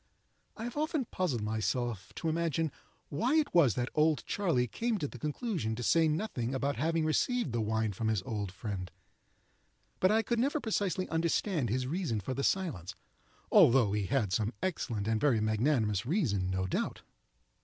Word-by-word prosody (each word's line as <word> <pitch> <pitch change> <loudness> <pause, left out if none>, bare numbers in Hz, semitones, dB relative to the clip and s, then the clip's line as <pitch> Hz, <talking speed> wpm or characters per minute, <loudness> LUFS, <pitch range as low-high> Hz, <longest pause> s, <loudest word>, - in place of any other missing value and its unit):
I 225 - -6
have 240 +4 -5
often 305 -3 0
puzzled 155 - -1
myself 110 0 -2
to - - -3
imagine 160 -1 0 0.4
why 235 - +1
it 310 -2 +2
was 150 - +5
that 125 0 -2
"Old 155 0 +2
Charley" 170 -12 +1
came 230 - -1
to 150 -6 -2
the 125 - -10
conclusion 150 - -2
to 120 - -5
say 165 +6 +4
nothing 150 - -2
about 140 +1 -1
having 160 +3 +1
received 235 - +1
the 115 0 0
wine 110 -1 0
from 110 +4 -2
his 110 -4 +1
old 100 -3 -3
friend, 95 -2 -5 1.1
but 185 - +4
I 220 +2 +3
could 235 +2 0
never 280 +5 +1
precisely 200 -6 -1
understand 165 - 0
his 125 +3 0
reason 150 - -1
for 105 +6 -4
the 140 +2 -2
silence, 130 - -1 0.6
although 120 -4 +6
he 105 -2 -1
had 115 -9 0
some 110 +2 0
excellent 115 - -2
and 110 -1 +1
very 130 -7 +3
magnanimous 110 -2 +1
reason, 115 - 0
no 95 0 -1
doubt. 95 - -2
135 Hz, 175 wpm, -31 LUFS, 110-180 Hz, 1.1 s, although